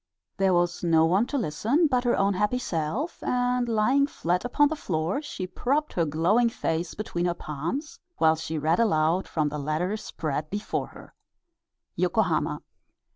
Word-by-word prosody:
There 190 -2 +3
was 175 0 0
no 165 -2 +4
one 190 +8 +2
to 285 - -2
listen 235 - +1
but 255 -4 +1
her 240 - +2
own 200 +1 +2
happy 210 +6 +1
self, 210 - -3
and 245 -1 0
lying 255 +6 +3
flat 180 - -1
upon 285 +4 +3
the 315 - -2
floor 175 - -2
she 245 -11 -5
propped 275 +11 -1
her 170 - +1
glowing 175 +11 +2
face 165 -5 -2
between 175 -5 -3
her 175 - -1
palms, 170 - -5 0.2
while 160 0 +4
she 160 0 -4
read 160 +5 +1
aloud 170 -4 +2
from 155 -2 0
the 150 +1 -5
letter 155 +7 -1
spread 155 -7 -4
before 205 +2 -3
her: - - -14 0.8
YOKOHAMA. - - 0
185 Hz, 165 wpm, -26 LUFS, 160-245 Hz, 0.8 s, no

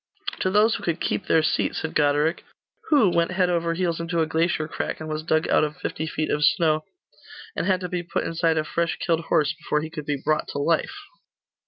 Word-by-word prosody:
'To 185 - +1
those 210 +3 +4
who - - -4
could 170 0 -1
keep - - -2
their 160 - +4
seat,' 155 - 0
said 160 - -3
Goderic. 150 +3 +2 0.5
'Who 255 - +5
went 170 +1 +1
head 180 -1 +2
over 170 -1 0
heels 170 -2 -1
into 170 0 -2
a 160 - +3
glacier 160 0 0
crack, - - -4
and 155 - -6
was 155 0 -3
dug 155 0 +1
out - - +4
of 150 -1 -2
fifty 160 - -4
feet 155 0 -2
of 150 - 0
snow, 155 +1 +3 0.7
and - - -1
had 185 -1 +2
to 180 - -3
be 180 0 -2
put 170 0 -2
inside 165 -1 0
a 155 - +2
fresh 170 +2 -1
killed 165 -1 0
horse 155 -2 +2
before 160 -2 -2
he 160 +1 -6
could 150 -2 -7
be 145 -1 0
brought 155 +2 0
to - - -4
life? 160 - 0
160 Hz, 225 wpm, -24 LUFS, 155-170 Hz, 0.7 s, Who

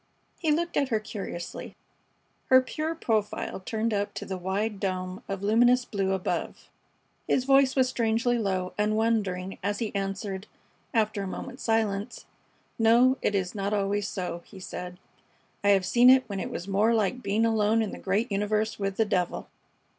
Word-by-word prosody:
He 320 -3 +1
looked 340 +3 0
at 280 -2 +2
her 220 -3 +1
curiously, 195 -5 -7 0.7
her 260 - +7
pure 310 +5 -3
profile 215 -11 -1
turned 220 +3 -2
up 205 0 -2
to - - -5
the 190 - -4
wide 195 +3 -2
dome 185 +1 -3
of 195 0 -4
luminous 240 +4 +4
blue 195 -4 -1
above. 190 -1 -3 0.6
His 255 - +2
voice 270 0 +4
was 260 -2 +3
strangely 235 0 +1
low 185 -3 -1
and 210 +1 +2
wondering 200 -5 0
as 200 +1 -1
he 220 -1 -3
answered, 195 0 -3 0.4
after 215 -4 +1
a 195 - -3
moment's 255 +7 -7
silence: 220 -1 -1 0.5
"No, 240 +4 +5
it 205 - +1
is 185 -2 -1
not 200 0 -2
always 200 0 0
so," 180 -3 -4
he 195 - -13
said. 180 -1 -7 0.7
"I 200 - +3
have 195 -2 +4
seen 240 +6 +6
it 260 0 +7
when 200 -3 -4
it - - -3
was 175 - -6
more 210 +4 +3
like 225 +4 0
being 220 +1 +1
alone 220 0 +2
in 210 - -4
the - - -8
great 205 +4 0
universe 210 +2 0
with 195 -1 -2
the 225 - +3
devil." 185 -4 -1
210 Hz, 175 wpm, -27 LUFS, 195-230 Hz, 0.7 s, her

